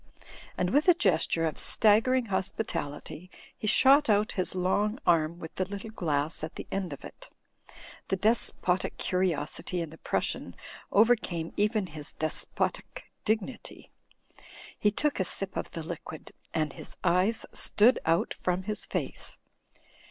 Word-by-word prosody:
And 180 0 0
with 290 - +3
a 355 - +8
gesture 165 - +2
of 160 - -2
staggering 230 +4 +4
hospitality, 185 -5 -4 0.3
he 215 - -5
shot 275 +5 +6
out 210 +1 +3
his 185 -1 -2
long 205 +5 +1
arm 165 -1 +3
with 160 -2 -9
the 185 - -1
little 200 +3 -7
glass 155 -6 0
at 155 - -5
the - - -6
end 195 -4 -2
of 140 - -8
it. - - -12 0.8
The - - +1
despotic 190 -3 +1
curiosity 180 -1 -1
in 165 -3 -4
the 160 - -13
Prussian - - -2 0.4
overcantie 200 -7 +2
even 210 0 +1
his 150 -4 -7
despotic 155 0 -2
dignity. 220 +3 -3 0.9
He 210 - +4
took 290 +6 -1
a - - +3
sip 190 +1 -3
of - - -3
the 165 - -6
liquid, 160 -1 -8 0.2
and 155 -3 -1
his - - -9
eyes 185 +6 +2
stood 230 +5 +4
out 165 +1 +1
from 180 +1 -2
his 210 +2 -4
face. - - -4
185 Hz, 145 wpm, -29 LUFS, 165-215 Hz, 0.9 s, a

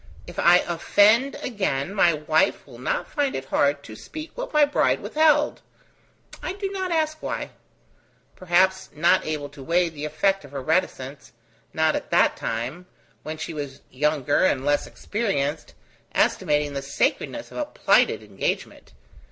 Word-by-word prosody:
If - - -8
I 175 +1 +6
offend 210 +9 +3
again, 190 - -2
my 175 -4 +4
wife 155 0 +1
will - - -13
not - - -2
find 285 -2 0
it 135 - -4
hard 140 +1 +1
to 110 - -10
speak 310 - -8
what - - -6
my 300 -1 +5
bride 290 - +1
withheld 300 -1 +2 0.8
I 360 - -3
do 395 0 -4
not 375 -2 -3
ask 310 -1 0
why: - - -4 0.8
perhaps 190 +1 +2
not 170 +3 +3
able 150 -2 -3
to 140 0 -13
weigh 170 +5 +2
the 150 -2 -7
effect 195 +5 +1
of 140 -1 -14
her 140 - -4
reticence: 145 -4 -2 0.4
not - - +2
at - - -4
that - - +3
time, 130 +11 -4 0.3
when 155 +1 -6
she 165 +1 -5
was 145 -3 -6
younger 145 +1 +1
and 135 -7 +2
less 145 0 +1
experienced, 155 -9 -2 0.4
estimating 150 -1 +1
the 140 - -3
sacredness - - -2
of - - -6
a - - 0
plighted - - +2
engagement. 100 -9 -4
165 Hz, 155 wpm, -24 LUFS, 145-215 Hz, 0.8 s, I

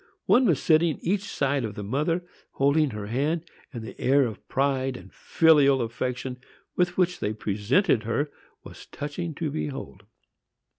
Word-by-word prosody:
One 240 +7 +5
was 165 -8 +3
sitting 160 -1 +3
each 195 +4 0
side 140 -7 0
the 105 -3 -5
mother, 150 - -1 0.3
holding 140 +2 +3
her 105 -3 -6
hand; 145 +9 -1 0.3
and 120 -5 -7
the 115 - -10
air 135 +1 +4
of 110 -3 -7
pride 135 -1 0
and - - -14
filial 145 -4 +4
affection 125 +2 -3 0.4
with 180 0 +1
which 180 -1 +1
they 105 - -1
presented 110 - +1
her 130 +7 -1 0.3
was - - -12
touching 150 +3 -5
to 155 -2 -3
behold. 135 -9 -5
140 Hz, 150 wpm, -26 LUFS, 125-165 Hz, 0.4 s, One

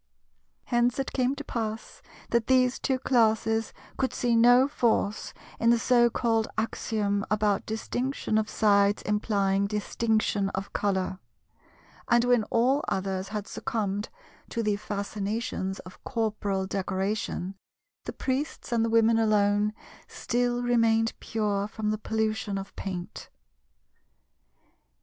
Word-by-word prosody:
Hence 240 0 +1
it 270 - -3
came 255 +1 +1
to 290 - -6
pass 225 -4 -5 0.3
that 235 -1 +2
these 255 -1 +3
two 265 -2 0
Classes 225 -3 +2 0.3
could 260 - 0
see 240 -1 +1
no 245 +3 +6
force 225 -6 0 0.3
in 230 - +3
the 235 - +5
so 240 0 +4
called 225 -2 +1
axiom 210 -2 -1
about 210 -2 +1
"Distinction 220 +1 -1
of 215 - -2
Sides 200 -1 +3
implying 200 -2 +1
Distinction 210 -1 0
of 195 +1 -5
Colour;" 190 -2 -1 0.9
and 240 0 +4
when 245 -3 +3
all 260 +7 +2
others 190 0 -2
had 210 -1 -4
succumbed 210 -6 -3 0.4
to 230 - -2
the 210 -1 +1
fascinations 205 -1 -3
of 185 - -14
corporal 210 -5 -1
decoration, 190 0 -2 0.5
the - - -5
Priests 270 +2 -3
and 230 -1 +2
the 230 - +1
Women 225 0 +4
alone 210 -1 +3 0.4
still 245 0 -1
remained 230 -2 +2
pure 205 -2 -1
from 215 0 -2
the 215 - -2
pollution 220 -2 -1
of 195 0 -7
paint. 180 -2 -6
220 Hz, 125 wpm, -27 LUFS, 205-235 Hz, 0.9 s, no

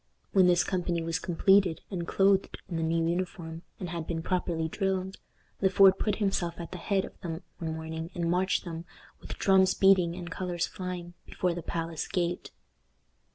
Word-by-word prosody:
When 190 -2 +5
this 175 -1 +4
company 175 -3 -1
was 165 +1 -1
completed, 190 0 +3
and 170 -3 -3
clothed 195 0 +2
in 170 - -3
the - - -1
new 165 0 +1
uniform, 170 -2 -3 0.2
and 180 - -4
had 165 -1 -4
been 165 -1 -3
properly 170 -3 -1
drilled, 190 +1 -2 0.4
Le 190 - +4
Fort 190 0 +6
put 210 -2 +1
himself 190 -5 -1
at 170 -1 -7
the 180 - -6
head 195 +2 0
of - - -13
them 165 0 -5 0.2
one 160 -2 -3
morning, 160 +1 -5
and 170 -2 -1
marched 185 +2 +1
them, 165 -1 -6 0.3
with - - -8
drums 190 -1 +4
beating 185 -3 +4
and 175 -1 -7
colors 180 -2 -2
flying, 180 -2 -6
before 180 -1 -1
the 175 - -5
palace 165 0 -3
gate. 175 -1 -2
175 Hz, 180 wpm, -29 LUFS, 165-190 Hz, 0.4 s, Fort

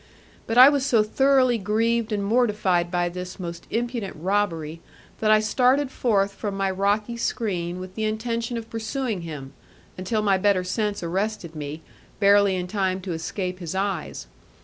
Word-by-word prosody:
But 225 - -1
I 255 +1 +11
was 285 -2 +3
so 235 -6 +3
thoroughly 255 +1 +3
grieved 225 +3 0
and 205 -1 -1
mortified 210 -6 +2
by 175 0 0
this 180 +2 -7
most 170 -1 -7
impudent 235 -3 -3
robbery, 165 -3 -1 0.4
that 215 - +1
I 215 0 +6
started 255 +5 +2
forth 200 -6 +1
from 200 0 -4
my 195 -1 0
rocky 205 +4 0
screen 180 -7 -2
with 185 0 -8
the 220 +2 -2
intention 230 +2 -2
of 225 -1 -6
pursuing 225 -2 -3
him, 145 -5 -8 0.5
until 210 +4 -1
my 195 -2 +3
better 195 -2 +2
sense 205 +1 -2
arrested 185 -1 -3
me, 150 +1 -6 0.4
barely 200 -1 +5
in 180 -1 -2
time 190 -1 -1
to 185 0 -5
escape 180 +3 -4
his 175 0 -5
eyes. 190 - -3
200 Hz, 165 wpm, -24 LUFS, 180-225 Hz, 0.5 s, I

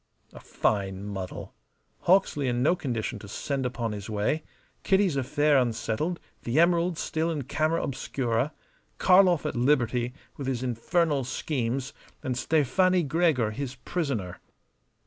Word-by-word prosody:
A - - -10
fine 95 -2 -1
muddle! 95 -3 -6 0.5
Hawksley 170 -7 +3
in 120 0 +1
no 165 +6 +4
condition 120 -7 -3
to 100 - -10
send 135 +5 -2
upon 120 -2 -3
his 105 -1 -6
way; 110 +9 0 0.4
Kitty's 190 -5 +2
affair 145 +2 +3
unsettled; 120 +7 -1 0.2
the 120 +6 0
emeralds 170 0 +3
still 160 +1 -1
in 155 -4 -2
camera 155 +5 0
obscura; 130 -1 -1 0.5
Karlov 180 -3 +5
at - - -2
liberty 125 -1 +1 0.2
with 140 - -5
his 130 -2 -1
infernal 140 +4 +1
schemes, 130 0 -2 0.3
and 130 - -1
Stefani 165 +7 +2
Gregor 150 -7 +2
his 130 +3 -5
prisoner. 125 - -3
135 Hz, 130 wpm, -27 LUFS, 120-160 Hz, 0.5 s, Karlov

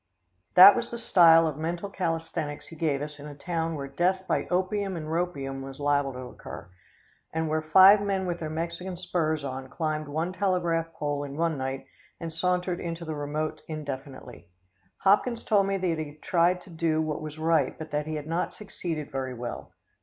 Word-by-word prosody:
That 190 +2 +11
was - - -2
the 235 - -5
style 165 -7 +6
of 155 -2 -2
mental 170 +4 -3
calisthenics 165 -5 -3
he 165 - -12
gave 150 -3 0
us 150 0 -8
in 145 - -8
a 145 - -9
town 165 +1 -2
where 140 -2 -5
death 180 +7 0
by - - 0
opium 190 +1 -1
and 155 - -5
ropium 155 -5 -2
was 135 0 -8
liable 145 -1 +1
to 125 - -7
occur, 90 -7 -9 0.6
and 160 0 -1
where 155 0 0
five 190 +6 +7
men 195 -2 -1
with 175 -1 -2
their 155 - -4
Mexican 170 +3 -4
spurs 165 -4 -1
on 130 -1 -5
climbed 155 -1 -2
one 160 +5 -2
telegraph 175 -4 0
pole 145 -2 -2
in 140 0 -7
one 165 -1 +1
night 135 0 -4 0.3
and 165 -1 -5
sauntered 180 +1 0
into 170 0 -5
the 160 - -3
remote 150 +1 -3
indefinitely. 135 - -7 0.5
Hopkins 230 +4 +3
told 200 -3 +3
me 195 0 0
that 175 -4 -1
he 150 -2 -5
had 150 - -24
tried 180 +1 +2
to 180 - -15
do 160 -1 0
what 155 -1 -2
was 155 0 -7
right, 160 0 +1
but 160 - -8
that 150 +1 -1
he 155 - -3
had 150 -1 -5
not 165 +3 -2
succeeded 165 -7 -5
very 130 -2 -3
well. 120 0 -6
160 Hz, 195 wpm, -27 LUFS, 145-180 Hz, 0.6 s, That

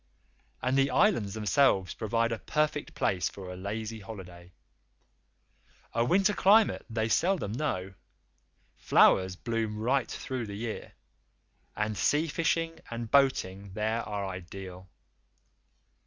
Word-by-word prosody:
And 125 +1 +1
the 135 0 +3
Islands 115 - +2
themselves 105 -3 +2
provide 115 +1 0
a 115 - -2
perfect 150 -1 -1
place 90 -2 0
for 95 -2 -8
a - - -8
lazy 110 +4 -5
holiday. 90 -4 -10 1.4
A 115 - +2
winter 190 +10 +3
climate 210 +3 +4
they 110 -1 -1
seldom 170 - +1
know; 95 -8 -2 0.8
flowers 95 -1 +4
bloom 115 +1 -2
right 120 +3 +1
through 125 -4 -4
the 100 - -6
year, 110 +1 -5 0.8
and 105 0 -1
sea 150 +9 +2
fishing 165 +1 -1
and 115 -1 -5
boating 100 -9 +2
there 110 +3 -1
are 100 -2 -4
ideal. 95 0 -8
110 Hz, 120 wpm, -29 LUFS, 95-135 Hz, 1.4 s, climate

